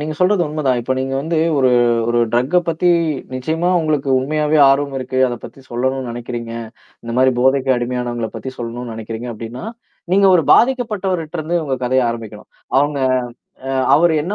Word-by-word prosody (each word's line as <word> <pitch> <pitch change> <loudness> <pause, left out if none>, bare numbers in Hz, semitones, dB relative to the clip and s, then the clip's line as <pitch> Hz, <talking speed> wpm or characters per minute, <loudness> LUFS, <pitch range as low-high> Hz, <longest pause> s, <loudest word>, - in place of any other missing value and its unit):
நீங்க 155 +1 -3
சொல்றது 180 0 +3
உண்மதான். 145 -5 0
இப்ப 130 +2 -1
நீங்க 135 0 -2
வந்து 160 +2 -1 0.2
ஒரு 130 -1 +3 0.4
ஒரு 120 0 +1
ட்ரக்க 130 +9 +2
பத்தி 165 +2 +1 0.5
நிச்சயமா 160 +7 -1
உங்களுக்கு 150 -3 -1
உண்மையாவே 150 +3 0
ஆர்வம் 140 0 0
இருக்கு, 130 0 -3
அத 120 - -4
பத்தி 135 - -11
சொல்லணும்னு 130 +1 -2
நினைக்கிறீங்க. 120 -1 -6 0.5
இந்த 115 - -5
மாரி 130 0 +5
போதைக்கு 130 +1 +2
அடிமையானவங்கள 120 -2 -3
பத்தி 115 +4 -6
சொல்லணும்னு 120 0 -5
நினைக்கிறீங்க 115 +2 -6
அப்படின்னா, 115 - -8 0.5
நீங்க 195 0 +5
ஒரு 165 - +4
பாதிக்கப்பட்டவரட்டருந்து 185 -10 0
உங்க 135 -3 -2
கதைய 130 +1 +2
ஆரம்பிக்கணும். 110 -2 -8 0.3
அவங்க 145 0 +1 0.7
அ - - -2 0.2
அவரு 165 +2 +4
என்ன 190 +6 -3
135 Hz, 155 wpm, -18 LUFS, 120-155 Hz, 0.7 s, மாரி